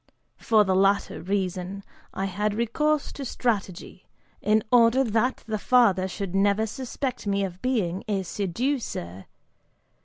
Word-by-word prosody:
For 220 -2 +4
the 190 -2 +1
latter 195 +1 +2
reason, 190 0 -3 0.3
I 190 - -3
had 205 +2 -1
recourse 295 +7 0
to 280 - -7
strategy, 200 -8 -3 0.3
in 215 +1 +2
order 245 +2 +5
that 230 +2 0
the 215 -1 -3
father 200 -6 +3
should 190 0 -5
never 200 +2 +2
suspect 255 +1 -5
me 200 0 +1
of 185 -1 -5
being 205 -9 -1
a 200 -3 -1
seducer. 190 - -3
205 Hz, 130 wpm, -25 LUFS, 190-235 Hz, 0.3 s, order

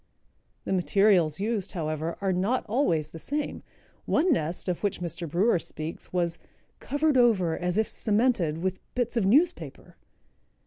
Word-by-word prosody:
The - - -1
materials 185 -4 +3
used, 205 -2 -1
however, 155 -1 -3
are 195 -1 +1
not 200 +8 0
always 205 - 0
the 165 - -9
same. 290 - -3 0.4
One 330 +2 +3
nest, 165 - -2
of 180 -2 -2
which 205 -2 -1
Mr. 170 -1 -5
Brewer 180 +4 +2
speaks, 155 0 -7
was 175 -2 0 0.4
"covered 290 0 +1
over, 200 -10 +3
as 180 +1 -2
if 220 -1 +2
cemented, 210 -9 +1
with 190 0 -1 0.2
bits 245 -1 0
of 215 -5 +2
newspaper." 320 - +1
190 Hz, 145 wpm, -27 LUFS, 170-235 Hz, 0.4 s, materials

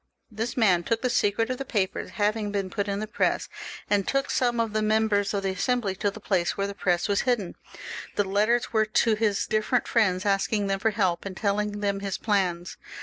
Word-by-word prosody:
This 225 +5 -4
man 190 -7 +4
told 230 +6 -1
the 250 - +1
secret 225 +2 +1
of 255 - -3
the - - -2
papers 200 -7 -2
having 210 0 0
been 195 -2 -2
put 205 -1 -2
in 200 0 -2
the 215 - -2
press, 215 - 0 0.4
and 205 -2 +1
took 275 0 0
some 240 -2 +1
of 225 -2 0
the 215 - +1
mem 220 +1 +2
bers 205 -1 +1
of 200 -1 -2
the 195 - 0
Assembly 215 +1 0
to 205 +1 +1
the 205 - -9
place 185 -4 0
where 200 - 0
the 200 - -4
press 180 -2 0
was 200 -1 +2
hidden. 240 -8 0 0.6
The 205 - +2
letters 215 +5 +1
were 220 -1 +3
to 220 +1 +3
his 210 -2 +1
different 215 +3 0
fidends, 200 -4 +2
asking 200 +1 +1
them 195 0 -1
for 225 - +2
help, 190 -5 0
and 190 -2 -7
telling 205 0 -1
them 200 -1 0
his 195 -1 -3
plans. 185 -4 -1
205 Hz, 220 wpm, -26 LUFS, 195-225 Hz, 0.6 s, man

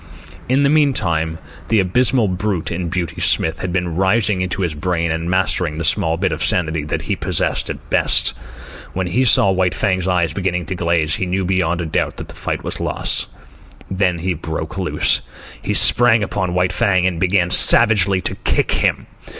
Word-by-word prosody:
In 135 +2 +2
the 140 - +2
meantime, 85 - 0 0.3
the 110 - +2
abysmal 120 +5 +1
brute 95 -1 -3
in 85 0 -4
Beauty 90 -1 -4
Smith 80 0 +1
had 95 - -4
been 90 -2 -2
rising 95 +1 +1
into 95 +2 -3
his 85 -3 -2
brain 85 +1 -2
and 80 +1 -4
mastering 95 -4 0
the 85 - -4
small 80 +1 0
bit 95 0 -1
of 80 +1 -3
sanity 80 -3 -1
that 75 - -4
he - - -3
possessed - - -2
at - - -8
best. - - +3 0.6
When 95 0 -3
he 110 +9 0
saw 100 -5 +4
White 95 -1 -1
Fang's 95 -2 -1
eyes 85 -4 0
beginning 90 -2 -3
to 85 - -5
glaze, 85 -3 -1
he 95 - -3
knew 95 +1 -2
beyond 85 -3 -2
doubt - - -2
that - - -9
the - - -9
fight - - -5
was - - -6
lost. - - -2 0.6
Then 95 -2 0
he 90 +2 -3
broke 80 -1 -6
loose. - - 0 0.4
He - - -3
sprang 120 -3 +6
upon 95 -3 -3
White 90 0 0
Fang 95 -1 +1
and 90 -3 -2
began 90 -1 0
savagely 100 -5 +7
to - - -3
kick - - -1
him. - - -1
90 Hz, 185 wpm, -17 LUFS, 85-95 Hz, 0.6 s, savagely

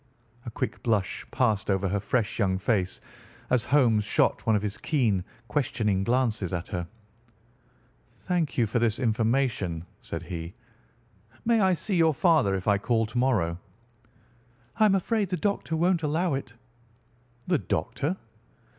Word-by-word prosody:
A - - -1
quick 115 - -4
blush 105 -5 -1
passed 110 -6 +1
over 95 0 +1
her 100 +2 0
fresh 115 +3 -1
young 95 -3 +2
face 95 -2 0 0.5
as 125 -3 +3
Holmes 120 -7 +3
shot 105 - +1
one 110 - +4
of 105 - +1
his 105 0 -4
keen, 115 - +1 0.2
questioning 110 -6 0
glances 115 -5 0
at 85 -1 -3
her. 90 -2 -3 1.2
"Thank 175 -5 -2
you 120 - +4
for 110 +3 0
this 115 -2 +1
information," 110 -7 0 0.2
said - - -6
he. 85 +2 -6 0.9
"May 230 0 +3
I 190 -3 +4
see 190 +2 -2
your 160 -3 +4
father 155 - +3
if 95 +1 -5
I 100 -1 +4
call 115 +1 +1
to 115 +3 -6
morrow?" 95 -10 +1 1.2
"I 215 - +5
am 200 -2 +4
afraid 205 +1 0
the 180 - -1
doctor 200 -5 -1
won't 175 +1 +2
allow 160 +2 0
it." 130 -3 -5 0.9
"The 175 -4 +2
doctor?" 125 - -2
115 Hz, 150 wpm, -27 LUFS, 100-155 Hz, 1.2 s, I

